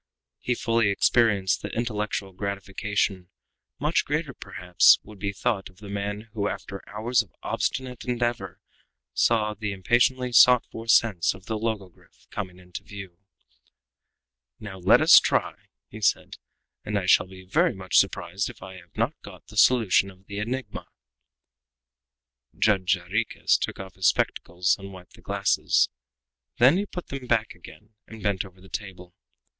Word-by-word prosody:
He 125 - -1
fully 115 -2 +1
experienced 100 -2 +2
the - - -5
intellectual 105 -4 -3
gratification 100 -1 -2 0.5
much 150 +4 +1
greater 150 0 -2
than, - - -39
perhaps, 90 -1 +4
would 105 -2 -14
be 100 0 -2
thought 100 0 -2
of 90 - -22
the 105 0 -11
man 100 +1 -3
who, 105 -2 -1
after 100 -1 -6
hours 115 +3 +1
of 105 - -15
obstinate 130 -2 -3
endeavor, 120 -7 -2 0.5
saw 110 - +2
the 105 0 -4
impatiently 125 +6 +1
sought 125 0 +6
for 115 0 -8
sense 110 -7 +3
of 95 - -15
the 110 - -3
logogryph 100 - -6
coming 95 -4 -6
into 90 +1 -9
view. 95 -3 -10 1.4
"Now 95 -3 -9
let 90 - +5
us - - +9
try," - - 0 0.3
he 110 - -11
said; 100 - 0 0.5
"and 105 0 -2
I 95 - -2
shall 90 0 +4
be 95 0 -13
very 95 - +2
much 95 -2 +2
surprised 90 +4 -1
if - - -12
I 95 0 -10
have 90 - -18
not - - +1
got - - -13
the - - -13
solution 105 -4 +4
of 95 0 -18
the 100 +1 -6
enigma!" 125 +5 -5 1.7
Judge 100 -3 +3
Jarriquez 100 +6 0
took - - -4
off 95 -1 -8
his 95 -1 +1
spectacles 90 +1 +1
and 100 0 -9
wiped 90 -1 -13
the - - -17
glasses; - - +1 0.7
then 130 +8 +6
he 205 +1 -2
put 180 -2 -8
them 135 -2 -6
back 115 -2 +1
again 105 +1 -15
and 110 -1 -11
bent 100 -3 0
over 95 -1 -15
the 95 - -16
table. 90 -3 -8
100 Hz, 160 wpm, -25 LUFS, 95-115 Hz, 1.7 s, us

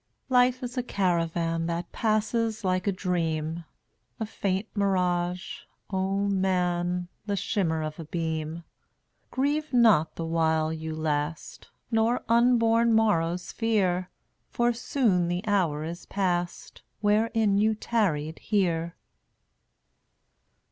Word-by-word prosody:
©mar - - -50
eun<$ - - -48
Life 250 +1 +4
is 245 +1 -5
a - - +2
caravan 170 -6 0
That 170 +1 -3
passes 220 0 0
like 185 0 0
a - - +4
dream, 165 -3 -2 0.5
A 220 - -1
faint 200 -1 -2
mirage, 180 -3 0 0.3
O 195 +1 0
man, 180 -2 0 0.2
The 205 - 0
shimmer 170 -5 0
of 155 +1 -5
a 165 - -6
beam. 160 0 -3 0.7
Grieve 295 +3 -1
not 220 - +4
the 165 - -4
while 160 -1 +1
you 160 0 -5
last, 150 0 -3 0.2
Nor 225 +2 +2
unborn 230 -1 +4
morrows 180 -5 +1
fear, 185 -5 0 0.4
For 240 0 +1
soon 225 -7 +1
the 175 +4 -2
hour 175 -8 +1
is 170 +2 -7
past 175 -3 -2 0.2
Wherein 215 -1 +2
you 220 +1 +3
tarried 165 -10 -1
here. 170 -5 0
185 Hz, 120 wpm, -27 LUFS, 165-220 Hz, 0.7 s, Life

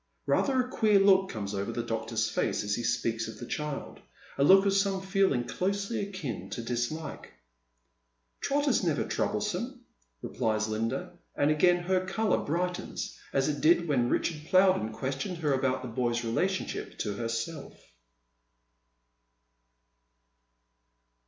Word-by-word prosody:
Eather 260 -2 +2
a - - -9
queer 220 -5 +3
look 195 -1 +5
comes 105 -2 -4
over 100 +3 -2
the 120 0 -3
doctor's 115 -1 -1
face - - -1
as 105 0 -1
he 120 - -1
speaks 115 -1 -1
of 110 - -8
the 120 - -7
child 150 +2 -4 0.2
— - - -22
a - - +5
look 195 +6 +7
of 200 - +3
some 195 -1 +2
feeling 190 -9 +1
closely 200 - -2
akin 155 - -5
to 115 - -5
disHke. 120 +7 -3 0.6
" - - -48
Trot 285 +1 +1
is 250 - +3
never 160 -5 +1
troublesome," - - -2 0.4
replies 110 -3 -1
Linda, 130 +12 -3 0.2
and 145 +1 +3
again 175 +3 +3
her 185 +1 +1
colour 210 +2 +1
brightens 180 +3 -3 0.2
as 135 -1 +1
it 150 -1 -2
did 170 +1 +4
when 125 -5 +2
Ricliard 155 -3 -1
Plowden 185 - +4
questioned 135 - -3
her 150 -4 +1
about 130 -1 0
the - - -4
boy's 120 0 -1
relationship 190 +12 -2
to 105 - -2
herself. 115 +7 -4
145 Hz, 145 wpm, -29 LUFS, 115-190 Hz, 0.6 s, look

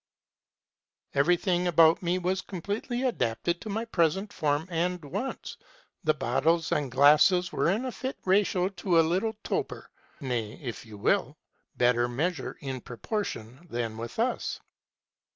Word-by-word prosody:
"Every 145 +6 +4
thing 180 -1 0
about 165 -1 +5
me 175 0 0
was 185 +1 -1
completely 205 +8 -4
adapted 170 - -1
to 220 - -7
my 220 +3 -2
present 190 +1 0
form 150 +1 0
and 175 0 -1
wants: 250 - -5 0.5
the 155 -2 +2
bottles 155 +6 +1
and 145 -3 0
glasses 150 +7 +5
were - - +1
in 215 +8 0
a 255 - -2
fit 260 +3 -5
ratio 190 -1 +2
to 185 -3 +1
a 165 - +5
little 195 +7 0
toper, - - -3 0.3
ŌĆö 135 - -7
nay, 115 -4 -2
if 120 -4 -7
you 105 -1 -10
will, 100 - +1 0.4
better 120 0 +3
measure 160 +9 -2
in 135 -3 -4
pro 120 - -10
portion 145 - -4
than 115 -2 -3
with 115 +1 -7
us. 240 +3 -1
170 Hz, 150 wpm, -28 LUFS, 135-190 Hz, 0.5 s, about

